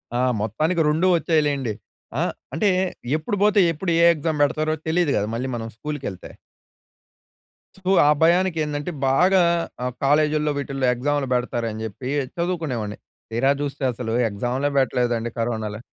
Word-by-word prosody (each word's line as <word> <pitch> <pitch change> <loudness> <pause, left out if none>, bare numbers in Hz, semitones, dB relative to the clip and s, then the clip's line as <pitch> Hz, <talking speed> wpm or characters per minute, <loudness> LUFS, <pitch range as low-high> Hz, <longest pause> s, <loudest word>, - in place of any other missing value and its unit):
ఆ! - - +1 0.2
మొత్తానికి 155 - 0
2 160 +5 +2
వచ్చాయి 165 -1 +2
లెండి. 135 -6 -1 0.5
ఆహ్, - - 0 0.2
అంటే 180 +8 +2 0.5
ఎప్పుడు 180 +6 -3
పోతే 210 0 +4
ఎప్పుడు 170 +3 -3
ఏ - - +5
ఎక్సామ్ 155 -1 -2
పెడతారో 155 +2 0
తెలియదు 165 -2 +2
కదా, 105 - 0
మళ్ళీ 125 +3 -2
మనం 115 -1 -4
స్కూల్‌కెళ్తే. 140 -9 -6 1.5
తు 190 -1 -5 0.2
ఆ - - +6
భయానికేందంటే, 165 -3 +1 0.2
బాగా 180 +8 +4 0.4
ఆహ్, 125 -1 -2
కాలేజిల్లో 150 +1 +2
వీటిల్లో 135 -2 -2
ఎగ్జాములు 145 +2 -1
పెడతారని 115 -3 -2
చెప్పీ, 110 +4 -6 0.3
చదువుకునేవాడిని. 160 - -2 0.3
తీరా 130 +4 +2
జూస్తే, 140 -1 -4
అసలు 115 -1 -4 0.2
ఎగ్జాములే 125 +7 -1
పెట్టలేదండి 120 -3 0
కరోనాలో. 110 -2 -2
145 Hz, 130 wpm, -23 LUFS, 120-160 Hz, 1.5 s, ఆ